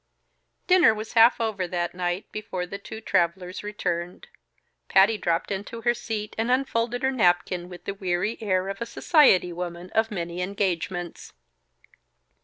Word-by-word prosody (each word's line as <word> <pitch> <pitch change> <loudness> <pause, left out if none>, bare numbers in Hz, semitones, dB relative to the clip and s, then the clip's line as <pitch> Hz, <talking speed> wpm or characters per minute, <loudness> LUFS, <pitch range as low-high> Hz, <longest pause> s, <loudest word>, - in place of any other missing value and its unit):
Dinner 360 -12 +5
was 215 +1 -7
half 230 +1 +6
over 215 -5 -1
that 175 -1 -2
night 180 +1 -2
before 185 -4 -4
the 195 +3 -7
two 220 +2 -9
travelers 180 -1 0
returned. 180 - -4 0.6
Patty 195 +3 +5
dropped 170 -2 -1
into 200 +4 -5
her 240 +1 +2
seat 220 -3 -5
and 225 +2 0
unfolded 245 -1 0
her 265 - +2
napkin, 180 -5 +1
with 180 -1 -11
the 200 - -3
weary 190 +3 -2
air 190 -3 0
of 195 +1 -5
a 235 - -2
society 230 - +4
woman 175 +1 -6
of 220 0 +1
many 175 -3 -4
engagements. 180 -2 -3
195 Hz, 150 wpm, -25 LUFS, 180-225 Hz, 0.6 s, half